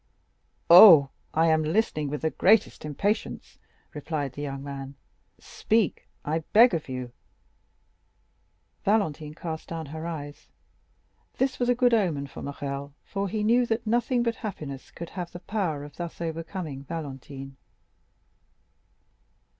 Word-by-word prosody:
"Oh, 170 Hz, -6 st, +10 dB, 0.2 s
I 160 Hz, +1 st, +2 dB
am 160 Hz, 0 st, +3 dB
listening 155 Hz, -3 st, 0 dB
with 150 Hz, +2 st, -5 dB
the 160 Hz, -, +1 dB
greatest 215 Hz, -4 st, +3 dB
impatience," 200 Hz, +9 st, -3 dB, 0.3 s
replied 150 Hz, -3 st, -4 dB
the 145 Hz, -, -7 dB
young 140 Hz, -1 st, -5 dB
man; 140 Hz, -1 st, -7 dB, 0.4 s
"speak, 220 Hz, -6 st, -1 dB, 0.2 s
I 155 Hz, +2 st, 0 dB
beg 230 Hz, 0 st, +7 dB
of 160 Hz, -4 st, -3 dB
you." 125 Hz, -1 st, -5 dB, 1.7 s
Valentine 160 Hz, -8 st, 0 dB
cast 160 Hz, -2 st, -6 dB
down 165 Hz, -1 st, -5 dB
her 160 Hz, +1 st, -5 dB
eyes; 145 Hz, -3 st, -7 dB, 0.9 s
this 265 Hz, 0 st, 0 dB
was 245 Hz, 0 st, +1 dB
a 245 Hz, -, +4 dB
good 245 Hz, -1 st, +3 dB
omen 170 Hz, -11 st, +1 dB
for 140 Hz, -, -10 dB
Morrel, 140 Hz, 0 st, -5 dB
for 200 Hz, -1 st, -3 dB
he 210 Hz, +2 st, -2 dB
knew 240 Hz, +3 st, +3 dB
that 225 Hz, 0 st, -1 dB
nothing 240 Hz, +2 st, +1 dB
but 230 Hz, -1 st, -1 dB
happiness 150 Hz, -, -7 dB
could 170 Hz, -, -8 dB
have 175 Hz, -2 st, -6 dB
the 175 Hz, -, -7 dB
power 180 Hz, -8 st, -2 dB
of 145 Hz, +1 st, -12 dB
thus 170 Hz, -1 st, -6 dB
overcoming 165 Hz, -3 st, -5 dB
Valentine. 135 Hz, -3 st, -7 dB
160 Hz, 135 wpm, -26 LUFS, 145-205 Hz, 1.7 s, Oh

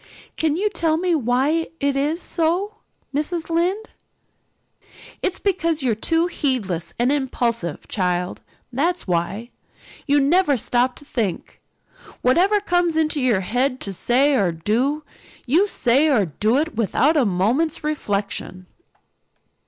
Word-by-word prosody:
Can 315 Hz, -2 st, 0 dB
you 410 Hz, +3 st, +1 dB
tell 320 Hz, -5 st, +1 dB
me 355 Hz, +1 st, 0 dB
why 285 Hz, +4 st, +1 dB
it 280 Hz, -1 st, 0 dB
is 300 Hz, +5 st, -1 dB
so, 360 Hz, +6 st, 0 dB, 0.4 s
Mrs. 325 Hz, +4 st, -2 dB
Lynde?" 370 Hz, +7 st, 0 dB, 1.3 s
"It's 370 Hz, -, -1 dB
because 335 Hz, -6 st, 0 dB
you're 245 Hz, -3 st, +2 dB
too 325 Hz, +10 st, +1 dB
heedless 245 Hz, -, -2 dB
and 245 Hz, +3 st, +2 dB
impulsive, 235 Hz, -, -2 dB
child, 180 Hz, -2 st, -2 dB, 0.3 s
that's 340 Hz, +8 st, 0 dB
what. 180 Hz, +6 st, -2 dB, 0.6 s
You 290 Hz, 0 st, +4 dB
never 290 Hz, 0 st, +3 dB
stop 245 Hz, +2 st, +1 dB
to 290 Hz, -, -13 dB
think 215 Hz, -10 st, -4 dB, 0.6 s
whatever 365 Hz, +11 st, +4 dB
comes 355 Hz, -4 st, +1 dB
into 310 Hz, -2 st, +1 dB
your 235 Hz, -7 st, +2 dB
head 250 Hz, +6 st, 0 dB
to 200 Hz, -, -3 dB
say 260 Hz, +9 st, +3 dB
or 200 Hz, -9 st, +2 dB
do 235 Hz, -, -1 dB, 0.4 s
you 330 Hz, +11 st, +3 dB
say 275 Hz, -3 st, +2 dB
or 245 Hz, -10 st, +3 dB
do 215 Hz, -, 0 dB
it 320 Hz, +3 st, -1 dB
without 240 Hz, +8 st, +2 dB
a 290 Hz, -, +4 dB
moment's 230 Hz, -, 0 dB
reflection." 200 Hz, -9 st, -3 dB
280 Hz, 130 wpm, -21 LUFS, 225-330 Hz, 1.3 s, You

